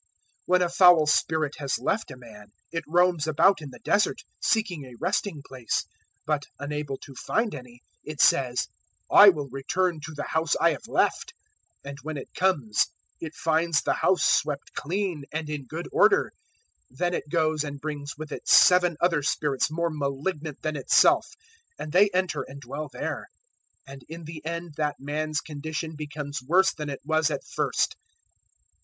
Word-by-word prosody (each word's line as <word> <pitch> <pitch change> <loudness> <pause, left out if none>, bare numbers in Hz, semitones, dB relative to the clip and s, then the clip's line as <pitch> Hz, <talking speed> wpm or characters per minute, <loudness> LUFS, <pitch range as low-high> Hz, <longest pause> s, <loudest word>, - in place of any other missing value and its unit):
011:024 - - -41 0.4
"When 180 0 +4
a 175 - 0
foul 175 -3 +6
spirit 155 0 +1
has 140 -2 -1
left 220 -2 -1
a 130 - -9
man, 110 -4 -13 0.2
it 165 -1 -3
roams 175 -1 +2
about 165 +4 +4
in 145 - -7
the 125 - -12
Desert, 210 - +1 0.2
seeking 205 -9 0
a 125 -2 -12
resting 180 -5 -1
place; 130 -3 -2 0.4
but, 150 -2 0 0.2
unable 145 -1 -4
to 135 - -12
find 220 - -1
any, 125 -1 -11 0.2
it 155 -1 -8
says, 125 -2 +3 0.4
`I 200 0 +10
will 150 -5 -5
return 165 +6 -1
to 155 - -8
the 145 - -4
house 160 0 0
I 170 0 +4
have - - -6
left;" - - 0 0.5
011:025 - - -6
and 140 - -9
when 155 +2 -5
it 135 - -9
comes, 145 - +1 0.3
it 160 -1 -7
finds 160 -1 +1
the - - +1
house 185 - +2
swept 150 -1 +1
clean 175 -3 -3
and 155 0 -3
in 145 -3 -5
good 165 +5 -6
order. 460 +4 +4 0.6
011:026 - - -20
Then 175 0 0
it 150 - -4
goes 155 -1 +1
and 145 -1 -6
brings 145 -1 -6
with 155 -1 -8
it - - -7
seven 180 -3 +6
other 170 -4 +2
spirits 145 -1 0
more 170 +1 -1
malignant 150 +1 -4
than 155 -1 -2
itself, 135 - +4 0.5
and 150 - -6
they 195 +5 +5
enter 185 0 0
and 140 +1 -9
dwell 145 +3 -6
there; - - -4 0.6
and 135 0 -11
in 165 +1 -8
the 155 0 -9
end 170 0 -5
that 150 -2 -1
man's 155 +2 -2
condition 155 +1 -5
becomes 145 -2 -5
worse 185 +8 +3
than 150 -2 -6
it 140 - -6
was 160 0 +2
at - - -3
first. - - -1
155 Hz, 175 wpm, -26 LUFS, 145-170 Hz, 0.6 s, `I